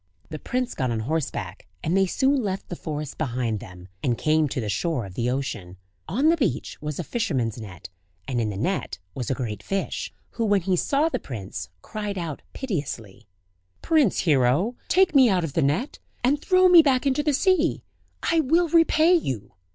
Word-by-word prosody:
The 155 -1 -6
prince 250 - -2
got 130 -2 -1
on 115 -2 -1
horseback, 115 - -3 0.2
and 165 +4 0
they 195 0 +4
soon 270 +7 +2
left 195 -3 -3
the 175 - -4
forest 150 -3 -5
behind 120 -6 -1
them, 90 -2 -11
and 120 -3 0
came 155 -1 +2
to 130 - -3
the 110 - -3
shore 120 - -1
of 95 - -10
the 120 +5 -1
ocean. 110 -9 -4 0.3
On 260 - +2
the 335 - +5
beach 200 - -1
was 150 -1 -4
a - - -2
fisherman's 130 - -2
net, 95 -5 -9 0.4
and 120 -3 0
in 110 - -1
the 100 - -5
net 125 - -2 0.2
was 125 +2 -4
a 130 - +1
great 115 -5 -4
fish, 195 0 -3 0.2
who 230 - -2
when 205 -2 +3
he 185 +1 +1
saw 280 - +2
the 330 - -2
prince, 95 -6 -7
cried 210 -2 -4
out 165 -5 -4
piteously: 140 - -5 0.6
"Prince 310 - +3
Hero! 150 - +2
take 370 -1 +4
me 265 -4 +7
out 185 -3 +2
of 155 -4 -4
the 165 - +1
net, 155 - 0 0.2
and 285 +4 +2
throw 370 +1 +5
me 355 -2 +9
back 270 -3 +2
into 275 +1 +2
the 300 0 +1
sea; 345 +2 +2 0.4
I 335 - +2
will 325 +4 +3
repay 330 +1 +5
you!" 130 - -1
165 Hz, 195 wpm, -25 LUFS, -, 0.6 s, me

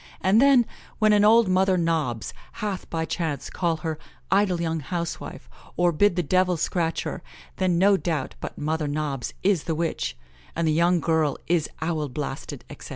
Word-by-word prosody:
And 195 +5 +4
then, 270 -3 +6 0.3
when 215 -1 +4
an 205 0 +4
old 225 +1 +6
Mother 185 0 +3
Nobs 155 - -1 0.2
hath 205 -4 -4
by 160 -1 -2
chance 160 -4 -3
called 165 -3 -1
her 160 -1 -3 0.3
'idle 195 -3 +3
young 165 -1 -1
housewife,' 170 - -5 0.3
or 175 0 +3
bid 180 +3 +3
the 180 - 0
devil 185 +2 +2
scratch 165 0 -1
her, - - -5 0.4
then 185 -2 +1
no 195 +2 +5
doubt 160 -8 -2
but - - -7
Mother 155 0 -1
Nobs 145 -3 -3
is 190 -5 +2
the 165 - -1
witch, 165 - -2 0.4
and 165 0 0
the 155 - +3
young 170 +2 +3
girl 160 -2 +1
is 165 -2 +1
owl 155 -3 -1
blasted, 140 +3 -5
etc. - - -10
170 Hz, 175 wpm, -25 LUFS, 155-185 Hz, 0.4 s, then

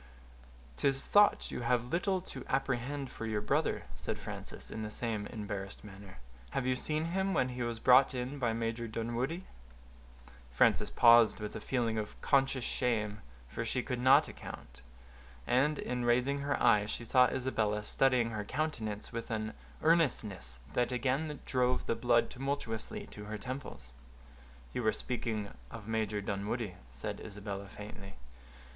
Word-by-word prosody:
"'Tis 135 -1 +2
thought 205 0 +4
you - - -4
have 120 +2 0
little 185 +2 +1
to 135 -7 -8
apprehend 135 +1 -1
for 115 - -5
your 110 -1 0
brother," 105 - 0
said - - -4
Frances, - - -7
in 110 - -4
the 105 - -3
same 105 -2 -2
embarrassed 100 -2 -6
manner. 100 -2 -11 0.3
"Had 125 - -2
you 130 0 +2
seen 155 +4 -1
him 190 +3 0
when 130 - +2
he 125 0 -5
was 120 -1 -1
brought 130 +3 +6
in 130 +3 -3
by 120 -3 +1
Major 115 +1 -2
Dunwoodie—" 120 +10 -2 1.1
Frances 65 - +3
paused, 115 -3 +6
with 105 -1 -5
a - - -5
feeling 115 -4 0
of 105 - -6
conscious 135 -2 +2
shame, 105 -5 0 0.3
for 65 - -5
which 115 - -2
she 125 - 0
could 125 -3 -3
not 130 +2 +6
account; 65 +1 -10 0.6
and, 140 +5 +3
in 125 -1 -2
raising 125 +4 +2
her 140 0 -1
eyes, 105 0 +4
she 115 - -4
saw 125 +1 +6
Isabella 115 -6 0
studying 125 0 +2
her 105 -2 -3
countenance 110 -5 -3
with 115 0 -4
an 110 -1 -2 0.3
earnestness 110 - +2 0.2
that 125 0 +1
again 135 +4 0
drove 125 -1 +1
the - - +1
blood 120 0 +2
tumultuously 130 -4 -3
to 105 - -8
her 105 +1 -4
temples. 125 - -7 0.8
"You - - -1
were 110 -2 +2
speaking 110 -4 -3 0.2
of 110 -2 -9
Major 110 -2 -1
Dunwoodie," 100 +1 -2 0.2
said - - -5
Isabella, 100 -1 -6
faintly. 100 -1 -9
120 Hz, 155 wpm, -33 LUFS, 105-130 Hz, 1.1 s, brought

